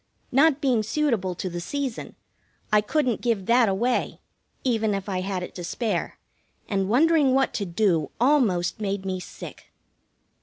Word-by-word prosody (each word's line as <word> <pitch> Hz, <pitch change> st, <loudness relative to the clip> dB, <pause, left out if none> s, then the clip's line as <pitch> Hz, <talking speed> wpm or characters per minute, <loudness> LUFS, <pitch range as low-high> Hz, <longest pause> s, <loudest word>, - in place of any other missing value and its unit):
Not 285 Hz, +2 st, +4 dB
being 255 Hz, -5 st, +2 dB
suitable 220 Hz, -6 st, 0 dB
to 185 Hz, -, -4 dB
the 175 Hz, -1 st, -4 dB
season, 270 Hz, +5 st, -4 dB, 0.6 s
I 210 Hz, -, +6 dB
couldn't 250 Hz, +1 st, 0 dB
give 225 Hz, -6 st, 0 dB
that 235 Hz, 0 st, +4 dB
away, 235 Hz, +6 st, 0 dB, 0.4 s
even 225 Hz, -5 st, +1 dB
if 195 Hz, 0 st, -5 dB
I 185 Hz, -2 st, -2 dB
had 185 Hz, -1 st, -3 dB
it -, -, -8 dB
to 180 Hz, -, -7 dB
spare, 205 Hz, +1 st, -2 dB, 0.5 s
and 195 Hz, -2 st, -1 dB
wondering 290 Hz, +1 st, +4 dB
what 270 Hz, 0 st, +2 dB
to 200 Hz, -, -2 dB
do 170 Hz, -5 st, +1 dB
almost 230 Hz, -10 st, +2 dB
made 200 Hz, -1 st, -2 dB
me 185 Hz, -1 st, -2 dB
sick. -, -, -10 dB
215 Hz, 155 wpm, -25 LUFS, 190-255 Hz, 0.6 s, I